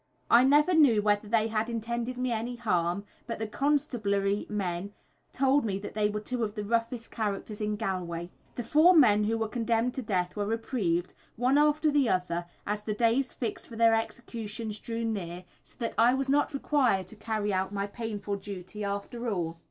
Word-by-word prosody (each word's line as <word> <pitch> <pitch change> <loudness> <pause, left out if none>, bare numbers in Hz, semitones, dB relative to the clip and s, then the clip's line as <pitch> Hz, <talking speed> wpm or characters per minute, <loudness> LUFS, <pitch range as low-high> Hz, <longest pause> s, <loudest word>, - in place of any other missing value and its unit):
I 235 +2 +8
never 295 +6 +5
knew 265 -10 +5
whether 205 0 +2
they 220 0 +2
had 220 +1 -1
intended 235 +2 -3
me 250 0 -1
any 235 +2 -2
harm, 180 -2 0 0.2
but 230 - -3
the 220 - -3
constabulary 215 -7 0
men 195 -1 -3 0.4
told 270 +2 +3
me 200 -4 -1
that 200 - -7
they 210 -1 +1
were 210 0 -2
two 240 +3 -3
of 210 -1 -3
the 210 - -3
roughest 230 +2 -1
characters 210 -1 -3
in 210 0 0
Galway. 175 -4 -3 0.3
The 240 - -3
four 310 +9 +5
men 210 -9 +6
who 225 +2 +1
were 225 0 -1
condemned 230 +1 0
to 265 - -3
death 185 -6 -1
were 205 -1 -2
reprieved, 205 -6 -1 0.2
one 255 +5 +3
after 300 +1 +3
the 285 -5 +3
other, 175 -2 -1 0.2
as 210 +1 -2
the 210 0 -3
days 235 +4 +2
fixed 235 -4 -4
for 230 - -10
their 230 0 +5
executions 225 -1 -4
drew 230 0 -3
near, 180 -5 -4 0.2
so - - -16
that 230 -2 -2
I 240 +3 +5
was 270 0 -1
not 290 0 +2
required 260 -9 +2
to 220 - -10
carry 215 -1 -2
out 190 +1 0
my 200 -1 -2
painful 205 -2 -4
duty 195 +1 -7
after 200 +4 -3
all. 170 -5 -2
220 Hz, 190 wpm, -29 LUFS, 200-240 Hz, 0.4 s, I